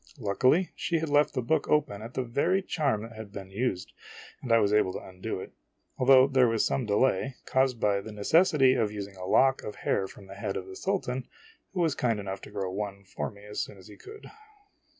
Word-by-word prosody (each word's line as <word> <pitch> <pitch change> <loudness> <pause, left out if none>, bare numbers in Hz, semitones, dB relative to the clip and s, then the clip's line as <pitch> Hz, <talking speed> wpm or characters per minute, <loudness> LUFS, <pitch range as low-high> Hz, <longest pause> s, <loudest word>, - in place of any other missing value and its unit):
Luckily, 130 - +2
she 170 - -1
had 160 -1 -2
left 145 0 +3
the 125 - -1
book 150 +5 0
open 145 -9 +1
at 115 +3 -9
the 130 - 0
very 165 +11 +1
charm 140 - 0
that 115 - -9
had 110 -2 -9
been 95 -2 -8
used, 100 -3 -2 0.5
and 120 - -4
I 115 - +7
was 105 -2 +2
able 105 -3 +3
to - - -4
undo 95 +3 -6
it; - - -9 0.5
though 130 0 +8
there 135 -2 +4
was 115 -1 +1
some 130 -4 -1
delay, 130 +3 +1
caused 130 -2 +1
by 100 -2 +2
the 110 - -9
necessity 135 - +4
of 110 -5 0
using 100 -2 -6
a 90 0 -7
lock 135 +6 +4
of 105 - -7
hair 95 - -1
from 95 - -14
the 95 - -11
head 100 0 -4
of 95 - -5
the 95 0 -10
Sultan, 130 - -2 0.5
who 185 - -1
was 160 -4 +2
kind 115 -6 0
enough 95 -1 -5
to - - -10
grow 95 -2 -3
one 100 0 -5
for 95 - -4
me 100 0 -15
as 105 0 -6
soon 100 - -10
as 95 - -15
he 105 - -12
could. 420 - -12
115 Hz, 230 wpm, -28 LUFS, 100-135 Hz, 0.5 s, though